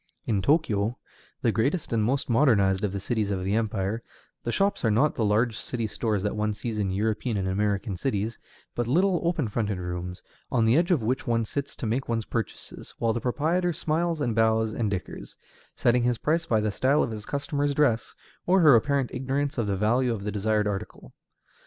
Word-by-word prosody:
In 100 -4 +1
Tōkyō, 115 - +1 0.5
the - - +3
greatest 140 +6 0
and 110 -2 +2
most 135 +6 0
modernized 110 -7 +3
of 105 - 0
the 100 - -3
cities 110 0 -1
of 95 -2 -2
the 95 +2 -1
empire, 110 -1 -1 0.4
the 120 - -2
shops 200 - 0
are 115 - +3
not 130 +8 +3
the 115 - -1
large 110 +2 +2
city 115 -3 -3
stores 105 -2 -1
that 105 - -1
one 105 0 -1
sees 110 +1 -4
in 100 -2 0
European 110 +3 -1
and 95 -1 -1
American 100 +1 -1
cities, 110 +1 -2 0.3
but 120 -1 -2
little 180 +7 +2
open 165 -6 0
fronted 105 -2 -2
rooms, 90 0 -5 0.3
on 120 -3 +2
the 115 +2 +4
edge 170 +3 +3
of 165 -11 +2
which 130 +5 -1
one 115 -1 +1
sits 140 +5 -4
to - - -5
make 120 +5 -1
one's 115 -2 -1
purchases, 115 -1 -6
while 115 -1 +1
the 120 - -3
proprietor 165 +7 0
smiles 165 +1 -1
and 120 -5 0
bows 110 0 +2
and 110 -2 -1
dickers; 95 -4 -6 0.4
setting 120 +1 +3
his 120 0 +1
price 165 +6 0
by 110 -6 +2
the 105 0 0
style 135 +8 +2
of - - -3
his 105 -1 -7
customer's 145 0 -1
dress, 120 -7 +1 0.3
or 185 +1 +5
her 155 -4 +8
apparent 135 +2 +2
ignorance 135 +2 -1
of 110 - 0
the 100 -1 0
value 120 +5 +2
of 105 -4 -3
the 105 - -2
desired 105 +1 +1
article. 95 -10 -5
115 Hz, 205 wpm, -26 LUFS, 105-140 Hz, 0.5 s, her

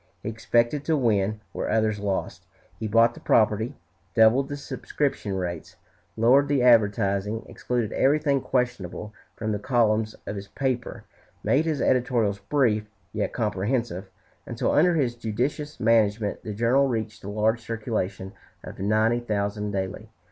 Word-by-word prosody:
He - - -2
expected 120 +5 +1
to 160 -2 +2
win 105 -4 +1
where - - -3
others 110 -1 +1
lost. 100 -2 -3 0.3
He 110 - -2
bought 115 +2 +4
the - - -12
property, 110 +1 +2 0.4
doubled 120 +5 +5
the 145 - -4
subscription 140 -7 -3
rates, 85 -3 -4 0.4
lowered 130 +6 +5
the 140 -3 +1
advertising, 105 -2 +3
excluded 120 -4 -2
everything 140 0 +2
questionable 120 -6 -2 0.2
from 110 0 -3
the 105 - -1
columns 110 -2 +1
of 105 - -5
his 100 0 -7
paper, 130 -1 -3 0.4
made 150 +4 +2
his 155 -4 -1
editorials 120 -6 +1
brief, 110 -2 +1 0.2
yet - - -1
comprehensive, 105 -2 -2 0.4
until - - -1
under 175 +3 +4
his 130 -6 +1
judicious 125 +7 -3
management 110 -2 +2
the 105 -3 -6
journal 125 +5 +3
reached 110 -3 -3
the 100 - -7
large 110 +2 +1
circulation 105 -4 -3 0.3
of - - -10
ninety 110 +4 +2
thousand 105 -2 -2
daily. 100 +2 -4
110 Hz, 140 wpm, -25 LUFS, 105-125 Hz, 0.4 s, doubled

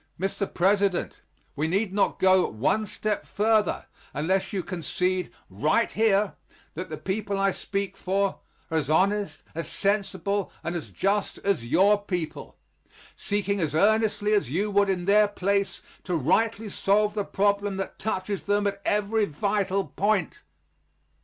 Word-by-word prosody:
Mr. 195 +1 -2
President, 195 0 +1 0.3
we 150 +2 0
need 195 +3 0
not 200 - +1
go 185 -1 +4
one 145 - 0
step 210 +1 -2
further 215 0 +1 0.3
unless 185 +6 0
you 190 -3 -2
concede 180 +2 -2 0.2
right 150 - +1
here 210 -1 +2 0.4
that - - -6
the - - -5
people 200 +1 -2
I 195 0 +2
speak 195 0 -4
for 195 +1 -1 0.3
are 160 - +2
as 145 -2 -4
honest, 190 -1 +1
as 165 -1 -4
sensible 200 -1 -1
and 170 +1 -3
as 170 - -5
just 200 +1 -1
as 195 -13 0
your 195 +9 +4
people, 175 -5 -5 0.6
seeking 205 -1 -1
as 155 -4 -1
earnestly 215 +2 +2
as 205 - +2
you 200 +9 -1
would 200 0 +3
in 180 -2 -1
their 210 +2 +5
place 200 0 -1 0.2
to 180 - -1
rightly 220 - +1
solve 205 +1 +2
the 210 -1 -1
problem 200 0 0
that 195 - -5
touches 200 -2 -2
them 205 0 +1
at 200 0 -2
every 210 +1 +1
vital 195 +3 0
point. 200 -4 0
200 Hz, 145 wpm, -26 LUFS, 180-205 Hz, 0.6 s, their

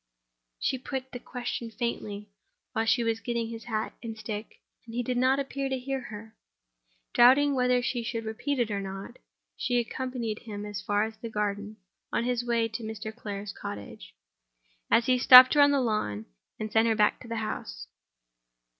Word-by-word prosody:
She 260 - 0
put 260 0 -5
the 245 - -6
question 245 -1 -5
faintly, 210 -3 -4 0.4
while 225 0 0
he 235 +1 +3
was 225 -1 0
getting 235 -1 -2
his 230 0 -8
hat 220 -2 -2
and 225 -2 -6
stick; 215 0 -6 0.2
and 230 0 -10
he 245 - 0
did 250 +1 -2
not 260 +2 +3
appear 275 0 -3
to 265 - -1
hear 270 +1 -3
her. 220 -2 -10 0.8
Doubting 270 +4 +6
whether 250 -1 +2
she 240 -1 -1
should 230 0 -4
repeat 240 +6 -2
it 235 -3 0
or 200 -1 -1
not, 195 +5 -7 0.4
she 245 - 0
accompanied 240 -2 -3
him 210 -3 -7
as 205 -1 -5
far 205 +1 +1
as 220 0 -5
the 230 - -7
garden, 210 0 -3 0.3
on - - 0
his 245 0 0
way 235 -1 +1
to 225 +1 -6
Mr. 220 0 -6
Clare's 205 -3 -6
cottage. 100 -13 -8 0.9
He 255 0 +2
stopped 255 0 +10
her 295 - +5
on 285 - +7
the 285 -1 +3
lawn, 215 - -1 0.3
and 215 0 -4
sent 220 +1 +4
her 225 - +3
back 210 -1 +3
to 250 - -12
the 230 - -4
house. 215 - -4
230 Hz, 180 wpm, -28 LUFS, 215-250 Hz, 0.9 s, stopped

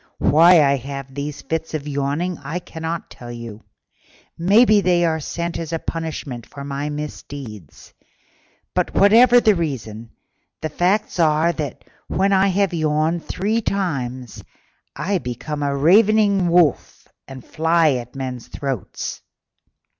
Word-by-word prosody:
Why 165 +2 +6
I 140 0 +3
have 135 +1 -7
these 145 +1 -5
fits 160 0 -3
of 150 -1 -5
yawning 145 +5 -2
I 165 - -4
cannot 165 -1 -6
tell: 115 -2 -9 0.7
maybe 205 +4 +4
they 175 -2 +2
are 160 -1 0
sent 170 +3 -4
as 165 -2 -5
a 165 - 0
punishment 155 -8 -5
for 140 - -9
my 140 +1 -4
misdeeds; 140 - -8 0.8
but, - - -1
whatever 235 +5 +6
the 220 -3 +4
reason, 115 - -4 0.5
the 155 - -3
facts 185 +5 0
are 160 +1 +3
that 150 -5 -5 0.2
when 195 +1 +1
I 195 +1 +4
have 195 -1 +1
yawned 155 +1 0
three 215 +5 -1
times 130 - -3 0.5
I 185 +6 -1
become 145 +3 -5
a 140 -1 -1
ravening 200 +4 +4
wolf 170 -5 +1 0.2
and 130 -2 -10
fly 160 0 +2
at 125 -1 -4
men's 130 -3 -5
throats." 135 -7 -5
155 Hz, 130 wpm, -21 LUFS, 140-180 Hz, 0.8 s, Why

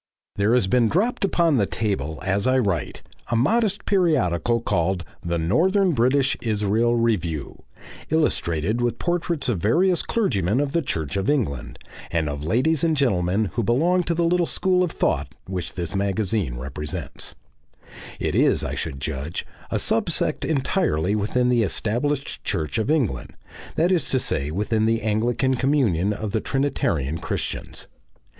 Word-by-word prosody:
There 105 +4 +2
has 125 - +3
dropped 125 - +2
upon 170 -6 +2
the 100 -4 +2
table 80 -9 -2
as 100 +4 +1
I 130 0 +3
write 100 -10 -1 0.2
a 120 - -1
modest 205 - +1
periodical 125 - +2
called 90 -4 0 0.2
THE 85 0 -1
NORTHERN 180 - +2
BRITISH 130 +2 +2
ISRAEL 110 +2 +1
REVIEW, 90 -11 -1 0.5
illustrated 110 - 0
with 120 -1 0
portraits 175 -3 -1
of 115 -8 0
various 170 - +3
clergymen 105 - 0
of 145 -1 0
the 170 - +1
Church 80 - -3
of 95 +5 0
England, 110 - -1 0.3
and 80 -2 0
of 70 0 -5
ladies 130 - +1
and 160 -2 +2
gentlemen 100 -5 +1
who 120 - 0
belong 160 - +2
to 170 - 0
the 170 0 +1
little 175 0 +2
school 185 -1 +1
of 180 - 0
thought - - -1
which 95 -2 -4
this 85 0 -4
magazine 100 - -1
represents; 70 +4 -6 0.8
it - - -1
is, - - +3
I - - -3
should 70 - -4
judge, 75 +2 -4 0.2
a - - 0
sub - - +1
sect - - 0
entirely 135 - 0
within 115 +4 +1
the 120 -2 +3
Established 120 - -1
Church 85 +3 -1
of 110 - -1
England, 150 -9 0 0.4
that 170 +4 +2
is 175 -4 +1
to 130 - +1
say 70 - -1
within 110 +6 0
the 115 0 +1
Anglican 115 +5 +1
communion 120 - +1
of 105 0 -4
the 110 0 0
Trinitarian 85 - -1
Christians. 85 - -4
115 Hz, 155 wpm, -23 LUFS, 90-145 Hz, 0.8 s, has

